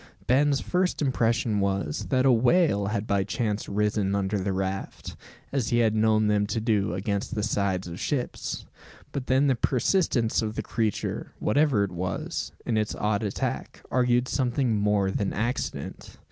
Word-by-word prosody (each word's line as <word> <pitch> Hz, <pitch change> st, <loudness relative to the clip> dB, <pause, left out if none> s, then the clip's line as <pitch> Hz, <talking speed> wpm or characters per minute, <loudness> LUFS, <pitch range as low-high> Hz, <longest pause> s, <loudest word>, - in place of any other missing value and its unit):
Ben's 140 Hz, +2 st, +3 dB
first 180 Hz, 0 st, 0 dB
impression 115 Hz, -4 st, +1 dB
was, 100 Hz, -6 st, -1 dB
that 130 Hz, -1 st, +2 dB
a 135 Hz, -, +6 dB
whale 120 Hz, -, +3 dB
had 105 Hz, 0 st, -2 dB
by 100 Hz, -2 st, +1 dB
chance 110 Hz, -1 st, -2 dB
risen 105 Hz, -1 st, 0 dB
under 100 Hz, +1 st, 0 dB
the 95 Hz, +1 st, -1 dB
raft; 95 Hz, 0 st, -4 dB, 0.4 s
as 135 Hz, -5 st, 0 dB
he 120 Hz, -, +2 dB
had 115 Hz, -2 st, +3 dB
known 110 Hz, 0 st, +3 dB
them 105 Hz, -1 st, +2 dB
to 110 Hz, +2 st, -1 dB
do 105 Hz, -4 st, +1 dB
against 100 Hz, +4 st, -2 dB
the 105 Hz, -, -1 dB
sides 100 Hz, -3 st, 0 dB
of 85 Hz, +1 st, -7 dB
ships. 135 Hz, -5 st, -3 dB, 0.5 s
But 135 Hz, -2 st, -4 dB
then 130 Hz, +2 st, +3 dB
the 135 Hz, -, +4 dB
persistence 125 Hz, -, +1 dB
of 110 Hz, -1 st, -3 dB
the -, -, -2 dB
creature, 110 Hz, -3 st, -2 dB
whatever 135 Hz, -3 st, +2 dB
it 100 Hz, -, -3 dB
was, 90 Hz, 0 st, -3 dB
in 115 Hz, -, 0 dB
its 105 Hz, -1 st, -1 dB
odd 105 Hz, -1 st, 0 dB
attack, 105 Hz, -3 st, -3 dB
argued 125 Hz, 0 st, +2 dB
something 125 Hz, -3 st, 0 dB
more 105 Hz, -2 st, +2 dB
than 100 Hz, 0 st, -1 dB
accident. 120 Hz, +5 st, -4 dB
110 Hz, 165 wpm, -26 LUFS, 100-125 Hz, 0.5 s, a